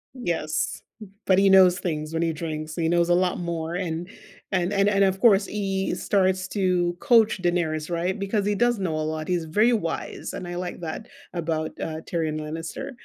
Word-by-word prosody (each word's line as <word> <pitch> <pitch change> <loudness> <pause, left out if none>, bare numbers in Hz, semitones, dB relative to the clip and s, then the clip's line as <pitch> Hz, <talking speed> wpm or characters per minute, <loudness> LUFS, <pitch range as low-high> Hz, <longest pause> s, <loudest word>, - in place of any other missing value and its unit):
Yes, 160 -9 -2 0.2
b 215 - -10 0.2
but 190 -1 +4
he 195 0 +5
knows 185 -1 +6
things 155 -2 -3
when 165 - 0
he 165 -1 +1
drinks, 155 -1 -5
he 165 -1 0
knows 170 0 +2
a 175 - +5
lot 180 0 +1
more, 170 -1 -3
and 175 -1 -3 0.4
and 185 0 +1
and 200 0 +2
and, 200 -1 +3
of 190 0 +1
course, 200 -3 +5
he 195 -2 -2
starts 190 -1 +1
to 180 -3 +1
coach 225 -7 +4
Daenerys, 165 -3 0
right? 175 +4 -1
Because 200 +1 -1
he 205 - +1
does 240 +1 +2
know 170 -5 -1
a 155 - -1
lot, 155 0 -4
he's 175 -3 0
very 215 +9 +3
wise, 165 -7 -3
and 180 - -6
I 175 - -5
like 180 0 -5
that 165 +6 -5 0.3
about, 160 -2 -2
uh, 160 0 -4
Tyrion 160 -3 -1
Lannister. 165 - -5
175 Hz, 200 wpm, -25 LUFS, 160-195 Hz, 0.4 s, knows